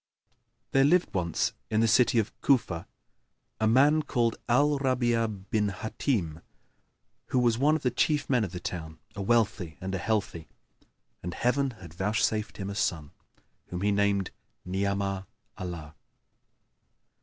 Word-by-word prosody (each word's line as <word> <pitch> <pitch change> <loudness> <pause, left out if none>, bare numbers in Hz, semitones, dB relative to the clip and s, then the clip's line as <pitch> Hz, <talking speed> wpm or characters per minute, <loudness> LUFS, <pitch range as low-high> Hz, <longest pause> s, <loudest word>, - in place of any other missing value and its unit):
There 135 - +4
lived 175 +5 +3
once 85 -3 0 0.2
in 110 - +1
the 115 - +4
city 120 +1 +4
of 110 -1 +1
Cufa[FN#1] 105 -11 +2 0.7
a 110 - +2
man 140 +7 +5
called 120 -6 0
Al 145 +4 +3
Rabн'a 120 -4 +1 0.2
bin 105 -2 +2
Hбtim, 95 - -2 0.9
who - - -1
was 120 -2 +3
one 150 +3 +4
of 160 - -3
the 125 - +2
chief 150 +3 +1
men 125 -4 +2
of 95 - -3
the 90 - -5
town, 80 -2 -6 0.2
a 100 - -4
wealthy 105 -7 +1
and 95 +1 -4
a 95 - -1
healthy, 100 -5 -2 0.7
and 90 0 -5
Heaven 135 +3 +1
had 85 -4 -11
vouchsafed 105 +3 0
him 100 0 -4
a - - -4
son, 80 -7 -1 0.6
whom 90 0 -5
he 105 +1 +2
named 100 -2 +1 0.3
Ni'amah 100 +1 -1 0.3
Allah. 85 -4 -6
105 Hz, 145 wpm, -28 LUFS, 95-125 Hz, 0.9 s, man